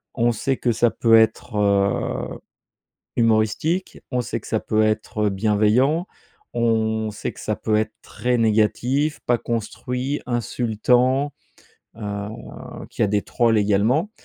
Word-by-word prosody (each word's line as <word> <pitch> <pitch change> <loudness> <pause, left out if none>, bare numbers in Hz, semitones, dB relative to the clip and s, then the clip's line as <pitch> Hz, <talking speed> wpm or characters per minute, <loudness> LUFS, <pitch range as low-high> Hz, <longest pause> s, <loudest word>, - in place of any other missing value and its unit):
On 120 0 +3
sait 130 +4 -1
que 120 - +1
ça 120 +1 +2
peut 115 -1 +4
être, 110 +1 +2
heu, 100 -1 0 0.8
humoristique, 115 - +1
on 125 -1 0
sait 115 -1 -3
que - - -14
ça 110 - 0
peut 110 0 +1
être 110 -1 0
bienveillant, 110 - +2 0.5
on 110 -1 +1
sait 105 - -5
que - - -13
ça 110 -1 -2
peut 110 - -1
être 110 0 -1
très 125 0 -1
négatif, 120 +7 +1
pas 120 -1 +3
construit, 125 +5 -3
insultant, 125 +4 +1 0.6
heu, 100 -2 -4 0.6
qu'il - - -2
y - - +6
a - - +3
des 100 0 +1
trolls 115 -2 +2
également. 105 - +2
115 Hz, 140 wpm, -22 LUFS, 105-125 Hz, 0.8 s, y